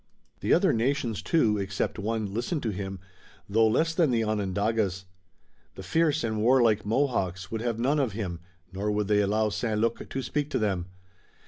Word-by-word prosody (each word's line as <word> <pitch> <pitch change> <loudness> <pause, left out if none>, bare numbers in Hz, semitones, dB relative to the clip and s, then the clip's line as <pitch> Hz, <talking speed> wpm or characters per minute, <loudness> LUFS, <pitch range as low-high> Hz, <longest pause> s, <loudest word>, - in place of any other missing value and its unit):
The - - -1
other - - +4
nations 120 -2 0
too, 110 -11 +2
except 100 +2 -2
one, 105 -1 -2
listened 125 - -2
to 110 - 0
him, 95 0 -5 0.5
though 110 +2 +4
less 160 +9 +2
than 165 -3 +3
the 115 -2 +1
Onondagas. 100 -1 -1 0.7
The 95 - -8
fierce 155 - +1
and 110 -2 -1
warlike 120 -2 +4
Mohawks 105 -6 -1
would 110 -1 -3
have 120 -2 -1
none 135 +6 +1
of 130 -7 0
him, 95 -6 -4 0.3
nor 100 +3 -2
would 105 -1 0
they 105 0 +3
allow 105 +2 +1
St. 110 0 -1
Luc 115 +1 -1
to 135 - -3
speak 150 +1 -2
to - - -1
them. 95 -5 -1
110 Hz, 180 wpm, -27 LUFS, 100-120 Hz, 0.7 s, other